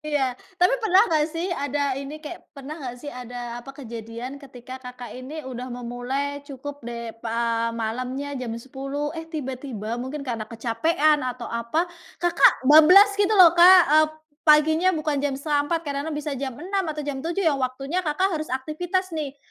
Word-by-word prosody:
Iya, 290 -4 0 0.2
tapi 360 +6 +4
pernah 390 -4 +5
nggak 300 -1 +3
sih 330 +3 -3
ada 285 -3 -2 0.2
ini 280 +2 -7
kayak 345 +3 -7 0.2
pernah 275 +2 -7
nggak 250 -3 -6
sih 290 - -6
ada 245 -1 -7
apa, 240 - -16
kejadian 235 +2 -7
ketika 260 -1 -10
Kakak 250 -1 -9
ini 280 +5 -8
udah 255 -1 -6
memulai 245 +4 -4
cukup 285 +1 -8
deh 235 -1 -6
pa 230 0 0
malamnya 255 +5 -3
jam 250 - -4
10.00, 275 +4 -5
eh 325 -1 -7
tiba-tiba 260 - -5
mungkin 275 +3 -5
karena 230 -4 -4
kecapean 295 +7 +1
atau 250 -2 -4
apa, 235 +9 0 0.4
Kakak 345 -1 +6
bablas 335 +9 +8
gitu 410 +1 +3
loh 355 -4 +9
Kak, 360 +2 +9
eee, 310 0 +6 0.4
paginya 315 +4 +5
bukan 300 -2 -1
jam 280 -1 -1
3.30, 295 +3 0
kadang-kadang 290 +2 -3
bisa 295 0 -4
jam 265 -3 -3
6.00 380 +4 -2
atau 305 -1 -3
jam 285 -2 -3
7.00 340 +6 -2
yang 290 -4 +2
waktunya 270 +7 -2
Kakak 360 +3 0
harus 310 - -5
aktivitas 340 +7 -2
nih. 290 -3 -4
285 Hz, 170 wpm, -24 LUFS, 250-315 Hz, 0.4 s, loh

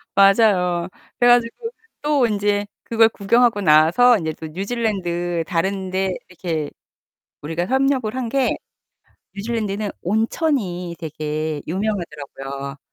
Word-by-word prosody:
맞아요. 195 -4 +4 0.3
그래 245 0 +5
가지고 245 - +2 0.3
또 290 -5 +2
인제 205 -1 0 0.2
그걸 225 -1 +4
구경하고 225 +1 +2
나와서 170 +9 +5
인제 160 -3 -3
또 160 - -8
뉴질랜드 175 -3 -2
다른 190 +2 -1
데 190 0 -1
이렇게 165 -4 -3 0.7
우리가 165 +4 -3
협력을 265 -3 +1
한 255 -2 -2
게 270 0 +1 0.8
뉴질랜드는 210 -1 -2
온천이 205 - -1
되게 155 -1 -3
유명하더라고요. 145 -7 -4
195 Hz, 270 characters per minute, -21 LUFS, 165-230 Hz, 0.8 s, 그래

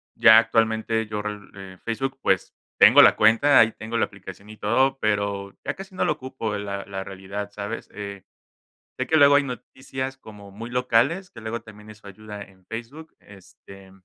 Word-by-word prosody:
ya 110 0 +8
actualmente, 110 0 +1
yo 105 -1 -4
re 105 0 -4 0.3
eh, - - -18
Facebook, 135 +4 -3
pues, 95 - 0 0.2
tengo - - +8
la - - +7
cuenta, 115 +7 +4
ahí 115 0 +5
tengo 110 +2 -5
la - - +2
aplicación 100 +1 -12
y 110 - -11
todo, 135 +6 +1
pero 100 -2 -2
ya - - -2
casi 190 0 -11
no - - 0
lo - - +2
ocupo, 130 -6 -5
la 100 -1 -5
la 95 0 -6
realidad, 100 +1 -7
¿sabes? 105 +2 -6
Eh, 100 -2 -8 0.7
sé - - -2
que 160 - +3
luego 140 -1 +7
hay 145 - +4
noticias, 130 +1 -6
como 105 -5 -13
muy 115 +4 -8
locales, 125 +9 +1
que 115 - -12
luego 110 +1 -5
también 105 -1 -14
eso 105 -1 -14
ayuda 105 +1 -10
en 95 -1 -21
Facebook, 120 +9 -8
este 95 0 -16
110 Hz, 185 wpm, -24 LUFS, 100-125 Hz, 0.7 s, ya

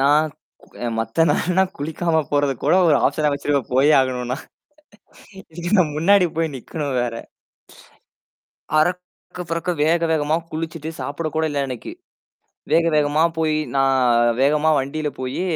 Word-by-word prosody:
நான் 145 +3 +4 0.6
அ - - 0
மத்த 115 +8 0
நாளெல்லாம் 185 +4 +1
குளிக்காம 160 +3 -2
போறது 145 -2 +1
கூட - - +3
ஒரு 145 - +5
ஆப்ஷனா 150 -1 +1
வச்சிருவேன் 140 -3 -2
போயே 145 +4 +4
ஆகணும்னா. 125 -1 -2 1.0
இன்னைக்கு 175 0 -7
நான் 155 -5 +2
முன்னாடி 185 +3 +4
போய் 165 -3 -1
நிக்கணும் 140 +1 -5
வேற. 120 -1 -3 1.6
அரக்க, 180 +2 -3
புரக்க 165 +2 -2
வேக 165 +2 +2
வேகமா 155 0 +1 0.2
குளிச்சிட்டு 160 0 -5
சாப்பிட 155 +3 -3
கூட 160 - +1
இல்ல 145 -1 -1
அன்னைக்கு. 125 - -7 0.8
வேக 165 - +4
வேகமா 150 +1 +2 0.2
போய் 155 -1 +1 0.2
நான் 125 -3 +3
வேகமா 150 +2 +3
வண்டியில 150 +2 -3
போயி 130 +7 -3
150 Hz, 130 wpm, -21 LUFS, 135-165 Hz, 1.6 s, ஒரு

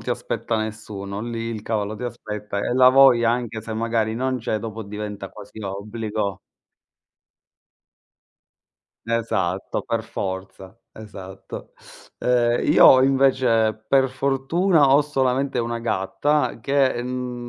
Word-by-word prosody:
ti - - -10
aspetta 115 - -2
nessuno, 105 -2 -5
lì 115 0 -5
il 110 -2 -5
cavallo 110 -1 -2
ti 125 - -9
aspetta, 105 -3 -5
e 100 - -1
la 125 0 +6
voglia, 130 -3 +6
anche 120 -2 -2
se 110 +1 -7
magari 115 -1 -1
non 130 +1 -1
c'è, 110 -1 -2
dopo 110 0 -6
diventa 105 -1 -6
quasi 105 +1 -13
obbligo. 105 0 -4 2.7
Esatto, 105 -5 -1
per 115 -1 -2
forza, 95 -1 -6
esatto. 95 -3 -10 0.4
Ehm, 120 -1 +2
io 130 - +8
invece, 130 -5 +3
per 135 +3 +3
fortuna, 140 +4 +2
ho 140 - +6
solamente 135 -2 0
una 115 0 -3
gatta 115 +7 0
che 135 -1 +1
n 125 -1 -5
115 Hz, 120 wpm, -22 LUFS, 105-130 Hz, 2.7 s, io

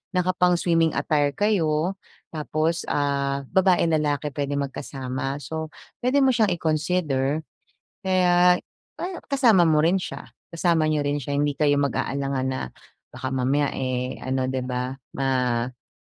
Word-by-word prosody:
naka 180 0 +1
pang 180 -1 +3
swimming 165 -2 +2
attire 145 -2 +1
kayo 170 -1 +1 0.4
tapos, 155 +1 -1
ah, 140 -1 0
babae, 190 -1 +4
lalaki 150 -2 0
pwede 145 0 -2
magkasama. 135 -1 -4
So, 160 +3 -5 0.3
pwede 260 +3 +2
mo 265 - +5
siyang 225 -4 +3
i-consider. 155 -3 0 0.6
Kaya, 180 -1 +4 0.4
pa - - -5 0.2
kasama 235 -10 +4
mo 155 -2 +4
rin 170 +4 +3
siya, 185 - -6 0.2
kasama 170 -1 +2
niyo 155 -1 +1
rin 145 0 0
siya. 145 0 -4
Hindi 145 0 0
kayo 145 -2 +3
mag-aalangan 140 -1 -1
na 130 0 -2 0.5
baka 130 +1 -6
mamaya, 135 +2 +1
eh, 130 0 -2
ano 130 0 -1
'di 130 0 -2
ba, 125 +1 -2 0.2
maiba. 125 -2 -1
145 Hz, 140 wpm, -24 LUFS, 135-175 Hz, 0.6 s, mo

